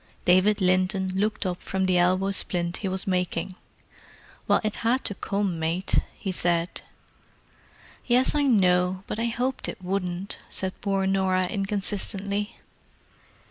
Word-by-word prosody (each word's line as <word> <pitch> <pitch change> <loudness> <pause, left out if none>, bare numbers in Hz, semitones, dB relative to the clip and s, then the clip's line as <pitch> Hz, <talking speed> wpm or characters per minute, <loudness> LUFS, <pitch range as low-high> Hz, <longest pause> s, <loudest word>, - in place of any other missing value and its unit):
David 190 +4 +4
Linton 185 +1 +2
looked 210 +2 0
up 180 -1 -2
from 190 0 -1
the 185 -1 +3
elbow 185 +2 +2
splint 175 -2 +1
he 200 - -3
was 190 0 -2
making. 180 -1 -1 0.9
"Well, - - +4
it 215 -1 -2
had 245 +3 +1
to - - 0
come, 195 -3 -2
mate," 165 +4 +1 0.2
he 195 - -3
said. 175 -1 0 1.3
"Yes, 250 +1 +4
I 295 - +2
know. 185 -5 +3
But 215 - -4
I 230 - 0
hoped 250 +3 -1
it - - -7
wouldn't!" 185 0 -3
said 190 0 -1
poor 195 -1 0
Norah 190 -1 +2
inconsistently. 200 +1 -2
190 Hz, 140 wpm, -26 LUFS, 180-205 Hz, 1.3 s, David